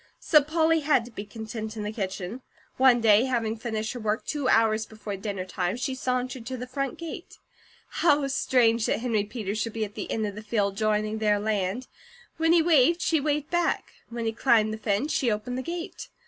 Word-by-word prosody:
So 305 -2 +5
Polly 320 +2 +2
had 290 -6 +2
to 240 - -12
be 210 -2 -7
content 220 +1 -6
in 210 - -3
the 210 - -3
kitchen. 195 +2 -4 0.4
One 255 -2 +5
day, 220 +1 +5
having 230 -4 -1
finished 220 -1 -3
her 245 - -6
work 215 +1 -1
two 285 -4 -1
hours 220 -1 +3
before 215 -2 -6
dinnertime, 190 -1 -3
she 265 +1 -2
sauntered 255 -1 -2
to 260 0 -4
the 250 - -5
front 270 +1 -3
gate. 335 +1 -8 0.5
How 295 -4 +2
strange 235 -4 +2
that - - 0
Henry 225 -4 0
Peters 210 -1 -4
should 225 0 -2
be 220 -1 -1
at 205 - -11
the - - -6
end 220 -1 0
of 205 - -4
the 210 - -8
field 205 -2 0
joining 215 0 0
their 210 -1 +3
land. 210 +2 -1 0.5
When 325 0 +3
he 335 -1 +5
waved, 330 0 +4
she 320 - +2
waved 295 0 -1
back. 345 0 0 0.2
When 235 0 -4
he 225 - +1
climbed 220 -2 +3
the 220 - -6
fence 220 +8 0
she 250 - +1
opened 215 +3 -2
the 260 - -2
gate. 340 +4 -6
230 Hz, 205 wpm, -26 LUFS, 215-265 Hz, 0.5 s, So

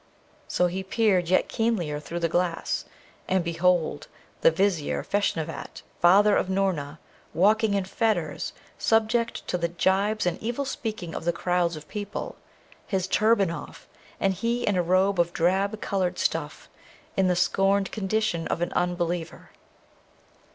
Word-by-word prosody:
So 180 - +1
he 180 +2 -2
peered 190 -3 +1
yet 185 - +3
keenlier 205 -11 -1
through 170 +3 -6
the 165 - +2
glass, 175 0 -1 0.4
and 185 -1 +1
behold, 170 -2 +1 0.3
the - - +7
Vizier 170 -2 0
Feshnavat, 170 -5 -2 0.2
father 200 +4 +6
of 185 - 0
Noorna, 180 -7 -1 0.4
walking 210 +3 +3
in 195 -2 0
fetters, 185 -7 -1 0.3
subject 225 +1 +1
to 180 - -1
the 170 - +1
jibes 195 +5 +1
and 175 -1 -1
evil 240 +5 -2
speaking 215 -10 -4
of - - -5
the 170 - +2
crowds 175 0 0
of 150 -1 -10
people, 205 -1 -5 0.5
his 190 -2 0
turban 205 -2 +3
off, 170 - -9 0.3
and 195 -1 +2
he 235 +5 -1
in 205 - +1
a 180 - +3
robe 185 +2 +2
of 170 0 +2
drab 195 +5 +1
coloured 185 -3 -1
stuff, - - -2 0.5
in 190 -1 +3
the 180 - +2
scorned 195 +2 +2
condition 205 -4 -1
of - - -2
an 175 - -1
unbeliever. 175 -1 -2
185 Hz, 145 wpm, -26 LUFS, 170-205 Hz, 0.5 s, the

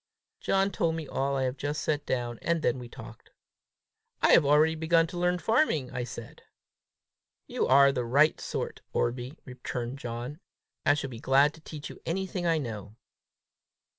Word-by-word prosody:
John 195 +1 +1
told 165 -6 0
me 160 -3 -5
all 140 +1 -1
I 135 - 0
have 130 +1 -2
just 145 +2 -3
set 150 -1 -1
down, 120 -2 -2
and 170 -2 0
then 125 +1 +1
we 120 -1 -9
talked. - - -12 0.9
"I - - +5
have 170 - +7
already 150 +3 +4
begun 165 +1 +3
to 175 +2 -8
learn 180 0 +2
farming," 220 - +1
I 125 -1 -3
said. 120 -2 -9 1.0
"You - - -1
are 140 +1 +7
the 125 -3 -2
right 140 +6 +3
sort, - - -4
Orbie!" 125 +5 -1
returned 125 0 -5
John. 120 +4 -5 0.5
"I 145 - +6
shall 135 -2 -4
be 115 - -8
glad 140 +4 +4
to 160 - -16
teach 155 -1 -8
you - - -13
anything 180 +1 -2
I 165 -1 +3
know." 110 -7 -6
145 Hz, 170 wpm, -28 LUFS, 125-160 Hz, 1.0 s, have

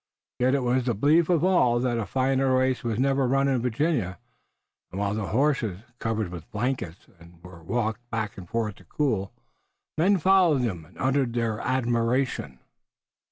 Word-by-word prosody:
Yet 130 +2 +3
it 135 - 0
was 125 0 +1
the 120 -3 0
belief 155 - +3
of 170 -3 +2
all 150 -11 +3
that 120 -1 0
a 110 - -3
finer 130 0 +1
race 130 0 +1
was 115 -3 -2
never 135 0 +2
run 135 +2 +2
in 130 -3 +1
Virginia, 120 - -1 0.7
and 95 - -6
while 100 0 0
the 105 -2 -3
horses, 120 -7 0 0.2
covered 110 -4 -2
with 85 -2 -9
blankets, 105 -6 -3 0.4
were 90 -2 -12
walked 120 +4 -2
back 110 -3 -3
and 90 -2 -11
forth 110 -3 -2
to - - -17
cool, 110 -10 -1 0.7
men 195 +4 +4
followed 180 -6 +4
them 90 -9 -3
and - - -21
uttered 130 -2 +1
their 115 -2 -1
admiration. 120 - 0
120 Hz, 165 wpm, -26 LUFS, 110-135 Hz, 0.7 s, men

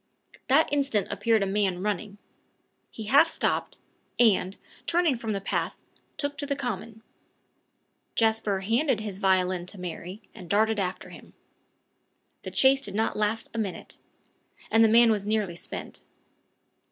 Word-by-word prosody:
That 285 +4 +4
instant 275 -8 +1
appeared 225 -3 +2
a - - +1
man 195 -2 0
running. 205 0 -3 0.7
He 220 - -8
half 280 +9 +5
stopped, - - -1 0.4
and, 200 -5 +3 0.3
turning 340 -5 +2
from 230 -2 -4
the 200 - -2
path, 195 - -2 0.4
took 285 0 -3
to 285 - -2
the 280 - 0
common. 230 -4 -5 1.1
Jasper 220 -3 +1
handed 230 +4 +1
his 205 -3 -6
violin 185 -2 +1
to 195 - -8
Mary, 180 +3 -7
and 180 -6 -11
darted 215 +2 +2
after 185 -1 -3
him. - - -14 1.1
The - - -6
chase 270 0 +4
did 200 -7 -5
not 220 +1 0
last 215 +1 -1
a 230 - -3
minute; 200 -4 -5 0.7
the 225 0 +6
man 230 +1 +6
was 210 -2 0
nearly 210 -4 0
spent. - - -6
215 Hz, 140 wpm, -27 LUFS, 195-235 Hz, 1.1 s, the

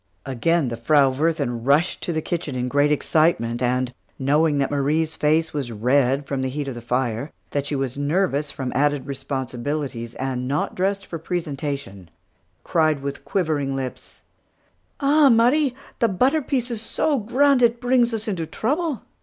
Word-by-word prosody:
Again 140 +3 +1
the 115 - -4
Frau 140 +3 +4
Wirthin 140 -5 -1
rushed 145 +7 +2
to - - -2
the 160 -1 -2
kitchen 165 -6 -3
in 125 0 -1
great 145 +3 +2
excitement, 145 -6 +1
and 125 0 0 0.2
knowing 145 +3 +2
that 140 0 0
Marie's 155 +3 0
face 160 +2 +1
was 140 -5 -3
red 130 +5 +2
from 140 -1 -2
heat 135 +2 -3
of 135 - -3
the 120 - -8
fire, 125 +2 -1 0.2
that 145 -1 -1
she 150 - -2
was 135 0 -2
nervous 150 -1 0
from 130 -3 -4
added 145 0 +1
responsibilities, 135 -2 -4
and 130 -1 -3
not 145 +3 -1
dressed 195 +1 -1
for 165 - -6
presentation 140 - -4 0.5
cried 155 -4 +1
with 140 0 -5
quivering 150 -7 -1
lips: 130 -2 -6 0.8
"Ah, 285 0 +5
Marie! 250 +4 +4 0.2
the 230 - +4
butter 255 - +2
piece 255 -3 -1
is 225 -2 -4
so 285 +5 0
grand, 260 +5 +3
it 235 0 +3
brings 245 -1 +3
us 225 0 -3
into 175 -6 -2
trouble. 290 - -1
145 Hz, 160 wpm, -23 LUFS, 130-185 Hz, 0.8 s, Ah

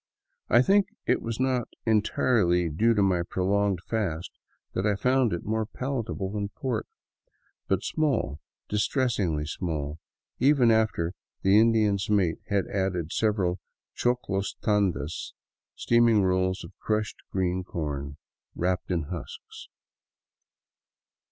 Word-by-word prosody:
I 120 +2 +6
think 195 +4 +4 0.2
it - - +2
was 115 0 -4
not 130 -2 +1 0.2
entirely 105 -5 +2
due 115 +10 +2
to 100 - +3
my 90 -3 +2
prolonged 95 +1 0
fast 90 -7 -2 0.4
that 95 - -1
I 105 -1 +2
found 125 +2 +2
it 85 - -3
more 110 0 -1
palatable 115 -6 -3
than 100 -1 -3
pork; 130 +4 -3 0.8
but - - +1
small, 135 - 0 0.3
distressingly 105 - 0
small, 75 -2 -3 0.4
even 130 -3 +5
after 100 -6 +1 0.3
the 95 +2 +6
Indian's 110 -4 +3
mate 95 -6 +2
had 100 -2 +1
added 95 -4 -2
several 100 -5 +1 0.4
choclo 120 -6 0 0.2
tandas, 95 -7 0 0.4
steaming 115 -3 +4
rolls 95 0 +1
of 85 +3 -11
crushed 110 -1 -1
green 95 -1 0
corn 70 -5 -4 0.4
wrapped 90 0 -1
in 85 -3 0
husks. 80 0 -8
100 Hz, 120 wpm, -27 LUFS, 90-115 Hz, 0.8 s, I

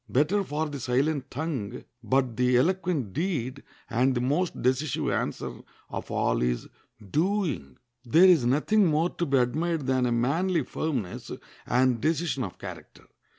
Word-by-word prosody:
Better 150 - +2
far 155 -2 -2
the 145 -2 -6
silent 135 +3 0
tongue, 135 -8 -4 0.2
but 130 0 +1
the 125 +1 +3
eloquent 165 - 0
deed; 140 -6 -2 0.3
and 130 +3 +2
the - - +1
most 145 +9 0
decisive 130 +2 0
answer - - -3 0.3
of - - -5
all - - +1
is - - -1 0.4
doing. 165 - 0 0.3
There 160 +9 +5
is 175 -8 +6
nothing 155 - +3
more 160 +2 +2
to 170 - -2
be 135 -1 +3
admired 155 +5 0
than 130 -1 +2
a - - 0
manly 155 +8 +1
firmness 125 - -3 0.4
and 125 -1 +2
decision 155 -4 0
of 95 - -6
character. - - -10
140 Hz, 150 wpm, -27 LUFS, 125-165 Hz, 0.4 s, is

